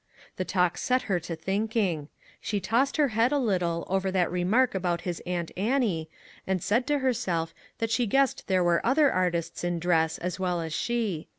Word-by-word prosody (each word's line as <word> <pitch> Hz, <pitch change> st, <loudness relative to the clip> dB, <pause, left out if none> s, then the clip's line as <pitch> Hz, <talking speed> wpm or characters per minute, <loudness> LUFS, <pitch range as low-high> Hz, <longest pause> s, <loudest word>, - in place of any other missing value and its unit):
The 185 Hz, -, -2 dB
talk 180 Hz, -2 st, +1 dB
set 255 Hz, 0 st, +1 dB
her 190 Hz, -4 st, 0 dB
to 170 Hz, 0 st, -5 dB
thinking. 195 Hz, -3 st, -1 dB, 0.3 s
She 205 Hz, -, -1 dB
tossed 235 Hz, -, +1 dB
her 295 Hz, -3 st, +3 dB
head 230 Hz, +2 st, +2 dB
a 290 Hz, -, +2 dB
little 180 Hz, -9 st, 0 dB
over 190 Hz, 0 st, 0 dB
that 185 Hz, -3 st, +1 dB
remark 205 Hz, +9 st, +2 dB
about 175 Hz, -3 st, -1 dB
his 175 Hz, -2 st, -4 dB
Aunt 175 Hz, -2 st, -2 dB
Annie, 200 Hz, -, 0 dB, 0.4 s
and 190 Hz, -2 st, 0 dB
said 240 Hz, +5 st, +1 dB
to 295 Hz, -1 st, +2 dB
herself 205 Hz, -12 st, -1 dB, 0.2 s
that 225 Hz, -1 st, -2 dB
she 240 Hz, 0 st, +1 dB
guessed 270 Hz, +5 st, +1 dB
there 185 Hz, -2 st, +2 dB
were 175 Hz, -1 st, +2 dB
other 280 Hz, +4 st, +4 dB
artists 175 Hz, -2 st, -1 dB
in 175 Hz, 0 st, 0 dB
dress 165 Hz, -2 st, +1 dB
as 180 Hz, +1 st, -4 dB
well 180 Hz, -2 st, 0 dB
as 160 Hz, -1 st, -4 dB
she. 220 Hz, -9 st, -1 dB
190 Hz, 190 wpm, -27 LUFS, 175-235 Hz, 0.4 s, other